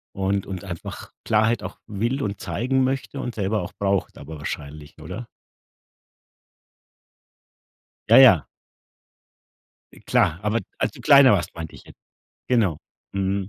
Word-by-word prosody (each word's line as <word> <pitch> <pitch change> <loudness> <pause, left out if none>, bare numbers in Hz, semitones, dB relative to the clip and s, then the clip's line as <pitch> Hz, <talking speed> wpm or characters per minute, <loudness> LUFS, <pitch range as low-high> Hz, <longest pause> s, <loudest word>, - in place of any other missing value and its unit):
und 95 0 -1
und 95 -2 -6
einfach 85 -4 -8
Klarheit 110 0 +2
auch 95 - -8
will 115 +7 -2
und 100 -1 -3
zeigen 130 +2 0
möchte 135 +1 -3
und 125 -3 -4
selber 105 0 -1
auch 90 +4 -7
braucht 100 -1 -1
aber 80 +2 -9
wahrscheinlich, 75 +1 -7
oder? 95 +9 -7 2.8
Ja, - - +7
ja. - - +8 1.5
Äh, - - -15
klar, 85 - +1
aber 110 +2 +1 0.2
als - - 0
du - - -13
kleiner 140 -4 +7
warst, 90 -3 -1
meinte 80 -2 -7
ich - - -14
jetzt. - - -17 0.5
Genau. 105 - +2 0.3
Mhm. 95 0 -1
100 Hz, 135 wpm, -23 LUFS, 90-115 Hz, 2.8 s, ja